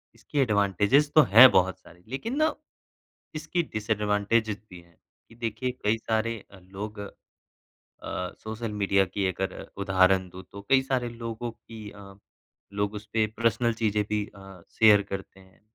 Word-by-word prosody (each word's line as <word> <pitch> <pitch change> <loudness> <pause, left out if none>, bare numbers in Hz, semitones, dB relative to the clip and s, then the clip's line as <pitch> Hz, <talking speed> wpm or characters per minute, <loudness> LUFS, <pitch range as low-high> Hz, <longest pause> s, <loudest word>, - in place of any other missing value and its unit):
इसके 145 - -4
एडवांटेजस 105 - +2
तो 155 - +9
है 125 +4 +11
बहुत 95 0 +2
सारी, 90 0 -19
लेकिन 220 - -4
ना 310 -1 +2 0.8
इसकी 155 +3 -2
डिसएडवांटेजस 105 0 0
भी 90 -1 -11
है 85 -1 -25 0.3
कि 115 - -17
देखिए 120 +2 -3
कई 105 +2 +2
सारे 115 +1 -1
अ, 95 - -14
लोग 100 +3 -8 0.8
अ, 90 0 -7
सोशल 110 0 -5
मीडिया 100 -1 +3
की 100 -2 0
अगर 95 +2 -4 0.3
उदाहरण 95 -1 +3
दूँ 95 +1 -11
तो, 100 - -8
कई 130 -1 +5
सारे 130 -2 -1
लोगों 115 0 -6
की 110 -2 -11
अ, 100 -1 -13 0.6
लोग 100 +1 -2
उसपे 110 +1 -1
पर्सनल 115 +1 +1
चीज़ें 105 -1 +2
भी 105 -1 -1
अ, 95 -2 -13 0.2
शेयर 105 -2 +7
करते 95 0 -7
हैं। 95 0 -22
105 Hz, 150 wpm, -26 LUFS, 95-115 Hz, 0.8 s, है